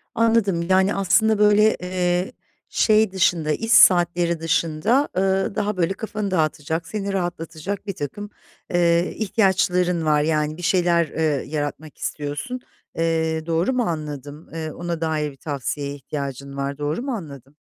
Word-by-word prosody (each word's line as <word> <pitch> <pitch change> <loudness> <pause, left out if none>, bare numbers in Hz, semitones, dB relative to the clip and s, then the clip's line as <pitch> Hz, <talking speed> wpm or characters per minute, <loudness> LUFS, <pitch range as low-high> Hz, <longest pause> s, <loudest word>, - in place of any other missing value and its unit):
Anladım, 225 -6 +2
yani, 190 +2 +3
aslında 210 +3 +3
böyle, 210 +1 +5
eee, 180 0 -1 0.4
şey 215 -2 +3
dışında, 175 -5 +1
iş 225 +8 -2
saatleri 175 -4 +5
dışında, 165 - +1
ııı, 190 +1 +1
daha 210 -1 -1
böyle 180 +2 +1
kafanı 210 -2 -4
dağıtacak, 160 -1 -1
seni 200 -2 -3
rahatlatacak 175 +2 -4
birtakım, 195 +3 -5 0.4
eee, 170 0 +2
ihtiyaçların 180 -5 +1
var. 150 -1 +3
Yani, 155 0 0
bir - - -8
şeyler, 175 -2 +2
eee, 155 -2 -1
yaratmak 150 0 -4
istiyorsun. 145 - -4 0.4
Eee, 160 -1 0
doğru 170 +9 +1
mu 250 -1 +1
anladım? 150 - -5
Eee, 160 -1 -4
ona 170 -1 -4
dair 155 -2 -1
bir 135 - -18
tavsiyeye 140 0 -4
ihtiyacın 140 0 -6
var. 140 +1 -3
Doğru 150 +8 -2
mu 270 0 -3
anladım? 145 - -8
170 Hz, 140 wpm, -22 LUFS, 155-195 Hz, 0.4 s, böyle